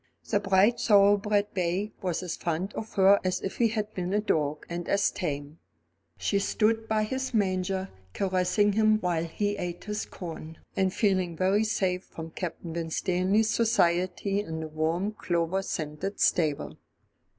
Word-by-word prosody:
The 205 - +2
bright 200 +3 +3
thoroughbred 205 0 +4
bay 185 +3 -1
was 180 -1 -2
as 180 - -3
fond 175 +4 -2
of 220 +1 -7
her 195 +1 +6
as 185 -1 0
if 195 - -4
he 235 - +4
had 215 -1 -3
been 180 +1 -3
a - - +3
dog, 150 -7 -1
and 175 0 -5
as 200 0 +2
tame. 145 -2 -4 0.6
She 200 - 0
stood 220 +2 +1
by 220 -1 +1
his 260 +3 -3
manger 190 -1 0 0.3
caressing 195 +2 +2
him 215 0 +4
while 175 -4 0
he 205 +5 -2
ate 175 -2 -5
his 210 0 -4
corn, 165 -3 -8 0.2
and 190 -1 +2
feeling 185 -5 +1
very 195 +4 +3
safe 190 -4 0
from 160 0 -9
Captain 170 -1 -5
Winstanley's 185 +6 +1
society 185 -2 +1
in 160 -6 -4
the 160 - -4
warm 160 +6 -1
clover 175 -2 -1
scented 160 +2 -4
stable. 155 -5 +1
190 Hz, 155 wpm, -28 LUFS, 170-205 Hz, 0.6 s, her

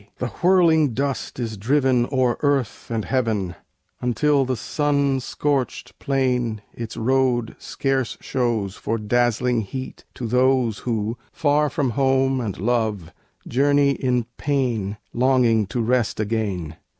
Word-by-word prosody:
The 125 - -3
whirling 165 -7 +4
dust 140 0 -2
is 115 -3 -4
driven 130 +2 +2
O'er 130 -3 +2
earth 140 -6 -1
and 115 -2 -2
heaven, 110 -8 0 0.5
until 135 +4 +2
the 130 0 -1
sun 140 +2 0
scorched 135 0 -2
plain 125 -5 0
Its 115 -2 -7
road 125 -1 +1
scarce 135 -2 -2
shows 115 -6 -1
for 115 - -2
dazzling 120 +2 +1
heat 130 +6 -7
to 125 - -5
those 125 -1 +2
Who, 115 0 -2
far 150 0 +2
from 140 -6 -1
home 135 0 +2
and 105 -5 -4
love, 105 -5 -1 0.3
journey 140 +2 +3
in 125 -3 0
pain, 120 -8 -1 0.2
Longing 120 -4 +3
to 120 - -3
rest 120 -1 +1
again. 100 -7 -2
125 Hz, 125 wpm, -22 LUFS, 110-135 Hz, 0.5 s, whirling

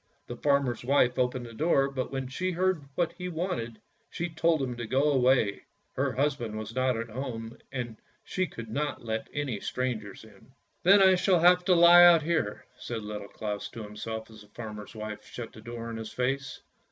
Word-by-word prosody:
The 120 - -7
farmer's 140 -4 +1
wife 130 -1 +3
opened 125 0 0
the 115 - -10
door, 140 +1 +2
but 135 -2 -4
when 135 -1 -3
she 185 +8 -2
heard 180 -4 0
what 170 -1 0
he 180 0 -3
wanted, 130 - -3 0.3
she 175 +1 -3
told 165 0 +2
him 130 -3 -2
to 120 -1 -5
go 135 +5 +2
away; 125 -6 +3 0.3
her 135 0 0
husband 135 -6 -1
was 110 +1 -6
not 130 -1 +1
at 115 0 -4
home, 115 -2 -5 0.2
and 120 -4 -5 0.3
she 185 -1 -1
could 115 -6 -9
not 145 -1 -3
let 110 -1 -3
any 140 -7 -2
strangers 110 -6 -3
in. 110 +3 -18
" - - -45
Then 195 +2 +7
I 190 0 +7
shall 180 -1 +3
have 180 +1 +6
to 180 - +5
lie 170 +1 +9
out 170 -3 +7
here," 130 -11 -1
said 115 -2 -5
Little 105 -1 -6
Claus 105 -1 -5
to 115 - -8
himself 110 +2 -6
as 110 - -13
the 105 - -15
farmer's 105 -1 -8
wife 110 -1 -6
shut 115 -2 -8
the 110 - -12
door 115 0 -6
in 115 - -5
his 110 -1 -6
face. 135 +2 -2
125 Hz, 200 wpm, -28 LUFS, 110-150 Hz, 0.3 s, lie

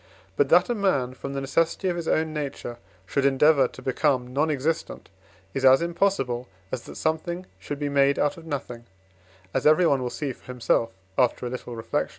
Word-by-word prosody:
But - - +2
that - - +6
a 240 - 0
man, 165 - +1
from 140 +1 -6
the 135 - -2
necessity 165 +7 0
of 180 - 0
his 170 -2 -4
own 160 0 +1
nature, 140 -5 -5 0.3
should 135 +8 0
endeavour 140 0 +5
to - - -13
become 130 -2 0
non 150 +4 +2
existent, 155 +3 -2 0.4
is 135 - -3
as 130 0 +7
impossible 170 -9 0 0.2
as 130 - -3
that - - -10
something 170 +3 -2
should 145 - -5
be 145 0 -2
made 140 0 +3
out 145 - +1
of 165 -1 -12
nothing, 125 -5 -5 0.7
as 135 - +2
everyone 155 -4 +4
will 125 - -2
see 140 0 -3
for - - -23
himself, 120 -2 0 0.3
after 125 0 +2
a 120 - -3
little 125 -1 -6
reflection. 115 - -2
140 Hz, 190 wpm, -25 LUFS, 130-160 Hz, 0.7 s, as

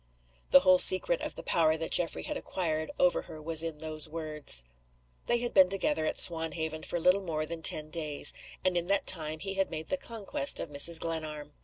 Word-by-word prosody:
The - - +6
whole 185 -1 +4
secret 345 - +5
of - - -6
the - - -9
power 160 -1 0
that 160 0 -6
Geoffrey 170 -2 +1
had - - -6
acquired 160 -4 -4
over 180 -1 +1
her 155 - -13
was 160 +1 +4
in 165 -2 -5
those 155 0 -3
words. 150 - +1 0.6
They 240 - +1
had 240 - -4
been 190 -2 +4
together 160 -5 -2
at - - -4
Swanhaven 160 -1 +1
for 175 - -5
little 180 +4 +2
more 155 -4 -5
than 165 +1 -8
ten 155 -1 +3
days; 155 -3 +2 0.3
and 185 -1 0
in 175 0 -2
that 200 0 -1
time 155 -3 0
he 195 0 -4
had 195 0 -2
made 155 - -8
the 280 - -2
conquest 270 +3 -2
of - - -7
Mrs. 160 +3 +4
Glenarm. 155 -3 -6
165 Hz, 205 wpm, -28 LUFS, 155-185 Hz, 0.6 s, The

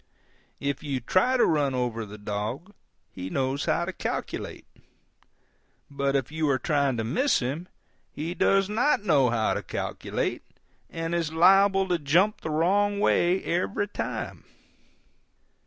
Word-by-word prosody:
If 140 0 -2
you 140 -3 -2
try 185 - +2
to - - +5
run 145 -4 +1
over 115 -3 -2
the 105 +1 -10
dog 105 - -4 0.4
he 90 0 -6
knows 135 +4 -1
how - - +1
to 190 - -5
calculate, - - -5 1.3
but 140 0 -1
if 135 0 -1
you 155 -1 0
are 135 - +3
trying 140 -2 0
to 110 - -1
miss 255 - +2
him 140 +8 -3 0.4
he 160 +4 -4
does 195 +1 +3
not 225 +3 +1
know 145 - +4
how 115 -2 +1
to - - -2
calculate, - - -3 0.5
and 165 0 -4
is 165 -3 -1
liable 195 +3 +5
to 175 -2 0
jump 175 +9 +2
the - - -4
wrong 200 +6 +2
way 180 -2 +2
every 185 +4 -1
time. - - -5
155 Hz, 145 wpm, -26 LUFS, 130-190 Hz, 1.3 s, to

